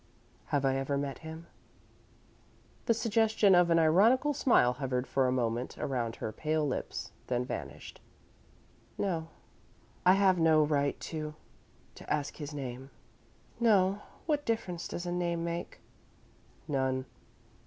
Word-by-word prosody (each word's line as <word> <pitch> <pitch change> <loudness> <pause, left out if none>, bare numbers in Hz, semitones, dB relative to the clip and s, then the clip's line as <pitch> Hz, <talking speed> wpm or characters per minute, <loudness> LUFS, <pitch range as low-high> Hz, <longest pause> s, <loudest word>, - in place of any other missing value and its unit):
"Have 140 -1 0
I 135 0 +2
ever 135 +1 -1
met 140 -1 -3
him?" 160 +1 -9 1.4
The 230 - +5
suggestion 220 -2 +3
of 175 -1 +5
an 165 - +4
ironical 210 - +4
smile 235 - +4
hovered 125 -1 -2
for 135 -1 +1
a - - +1
moment 120 -1 -1
around 120 -4 -2
her 110 - -4
pale 155 +3 -1
lips, 130 - -4 0.2
then 125 0 0
vanished. - - -7 1.0
"No." 165 -5 -1 0.8
"I 180 - +7
have 190 -2 +4
no 160 -1 +5
right 145 -2 0
to 155 -1 -5 0.6
to - - -10
ask 145 -2 -1
his 150 -1 -6
name." 135 -2 -6 0.7
"No. 205 -4 +3 0.2
What 295 -2 0
difference 190 -8 -2
does 175 - -5
a 175 - -2
name 170 -1 -1
make?" 170 0 -5 0.9
"None. 130 -2 0
160 Hz, 130 wpm, -31 LUFS, 135-185 Hz, 1.4 s, I